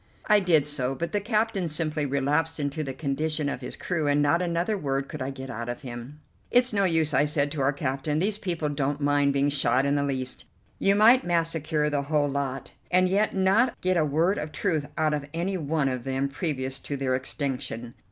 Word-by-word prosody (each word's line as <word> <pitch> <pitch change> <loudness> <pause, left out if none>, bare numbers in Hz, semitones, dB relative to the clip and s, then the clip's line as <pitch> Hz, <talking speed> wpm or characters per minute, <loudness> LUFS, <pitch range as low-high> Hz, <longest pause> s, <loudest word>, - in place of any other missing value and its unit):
I 210 -1 +5
did 165 -7 +3
so, 135 -3 0
but 170 +4 -3
the 205 - 0
captain 210 -3 0
simply 155 -1 -1
relapsed 150 +4 0
into 145 +2 -2
the 135 - -4
condition 150 +2 -2
of 140 -2 -3
his 125 - -5
crew, 165 -5 -2
and 145 0 +3
not 145 +4 +3
another 175 +4 0
word 140 -6 -2
could 155 - -7
I 130 - -2
get 135 -1 -7
out 120 0 -5
of 120 - -5
him. 125 +4 -8 0.3
"It's 245 -1 +3
no 200 -1 +3
use," 160 -4 +2
I 145 +3 +4
said 145 -1 +1
to 150 -2 -3
our 135 +1 +3
captain, 140 +1 -2
"these 200 +5 +1
people 170 -6 -2
don't 145 0 -1
mind 145 -1 +2
being 140 +1 +2
shot 135 -1 +2
in 140 - +2
the 145 - +1
least. 130 -2 -3 0.3
You 195 0 +3
might 230 +5 +6
massacre 165 -3 0
the 145 -1 0
whole 145 0 +1
lot, 135 -1 -3 0.2
and 185 +1 +4
yet 200 +3 +1
not 195 +6 +2
get 185 0 +1
a 165 - +3
word 160 +7 +1
of 150 0 -5
truth 155 -7 -1
out 155 -1 +2
of 145 -1 -3
any 180 +3 -1
one 155 -3 0
of 130 -2 -2
them 135 +1 -1
previous 135 -3 -3
to 140 - -5
their 130 -1 0
extinction. 130 -3 -4
150 Hz, 215 wpm, -26 LUFS, 135-170 Hz, 0.3 s, might